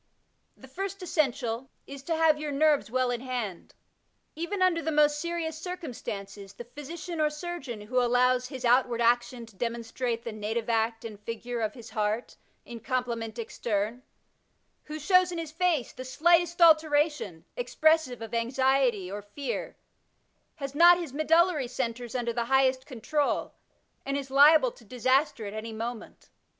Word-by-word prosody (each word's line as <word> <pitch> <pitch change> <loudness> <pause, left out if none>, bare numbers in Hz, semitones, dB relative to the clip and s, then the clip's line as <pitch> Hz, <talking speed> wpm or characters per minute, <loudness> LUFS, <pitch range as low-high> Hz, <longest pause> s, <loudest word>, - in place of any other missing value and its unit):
The 265 - -14
first 390 +6 -5
essential 255 -7 -1 0.2
is 275 -1 -9
to 330 - 0
have 320 -2 +3
your 300 -1 -3
nerves 295 -2 +2
well 255 +1 +1
in 240 -1 -3
hand. 245 -8 -5 0.6
Even 345 +6 -3
under 365 -3 +3
the 320 - -2
most 295 -1 +3
serious 330 -1 -3
circumstances, 210 - -7
the 240 - -9
physician 310 +6 -6
or 305 - +3
surgeon 300 -7 -6
who 250 +4 0
allows 250 +1 +2
''his 260 -2 -6
outward 245 0 +3
action 240 0 +1
to 225 -3 -19
demon 235 +2 -3
strate 230 0 -3
the 235 - -5
native 215 +2 -3
act 225 0 0
and 215 -3 -8
figure 230 +2 -5
of 215 -1 -2
his 235 -3 -11
heart 215 +1 -2 0.3
in 235 -1 -8
complement 235 -3 -3
extern," 225 0 -2 0.8
who 305 0 -6
shows 365 +3 +3
in 345 - -4
his 325 -2 -5
face 330 -5 0
the 255 - -8
slightest 340 +6 +2
alteration, 300 - +3
expressive 315 - +1
of 225 +1 -9
anxiety 240 -4 +1
or 205 +1 -5
fear, 235 +8 -5 0.8
has 275 -3 -6
not 345 +3 +7
his 335 -7 -6
medullary 315 -1 +3
centres 240 -1 -4
under 235 -2 -1
the 235 0 -1
highest 265 +1 +2
control, 290 +3 -1 0.5
and 275 +1 -2
is 275 -1 -6
liable 285 -1 +6
to 235 - -18
disaster 255 +1 +1
at 200 - -6
any 220 +1 -5
moment. 225 +1 -7
255 Hz, 160 wpm, -28 LUFS, 230-310 Hz, 0.8 s, not